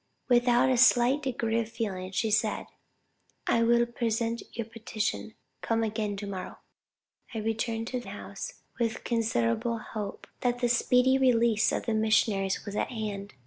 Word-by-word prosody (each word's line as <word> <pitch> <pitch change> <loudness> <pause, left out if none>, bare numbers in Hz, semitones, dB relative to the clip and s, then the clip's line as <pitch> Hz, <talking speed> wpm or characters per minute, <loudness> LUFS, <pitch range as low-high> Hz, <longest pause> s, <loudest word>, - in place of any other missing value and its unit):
With 245 0 +4
a 250 +1 +4
slight 255 +3 +5
degree 240 -4 -1
of 225 -1 -3
feeling, 190 -6 -4
she 215 +3 -1
said, 220 0 +1 0.8
'I 230 - +2
will 235 0 +4
present 235 -1 -1
your 230 -1 -4
petition; 220 0 -4 0.3
come 225 0 0
again 215 -2 -2
to 205 - -5
morrow. 195 -2 -6 0.8
I - - -2
returned 225 +1 -1
to 250 - -2
the 230 -5 -10
house, 195 -1 -8 0.2
with 230 -1 -1
considerable 230 - 0
hope 215 -2 -6
that 245 -1 0
the 245 -1 0
speedy 250 +2 +4
release 235 -4 +3
of - - -2
the 230 - 0
missionaries 215 -3 +2
was 205 -1 -6
at - - 0
hand. 210 -4 -5
225 Hz, 155 wpm, -28 LUFS, 215-240 Hz, 0.8 s, slight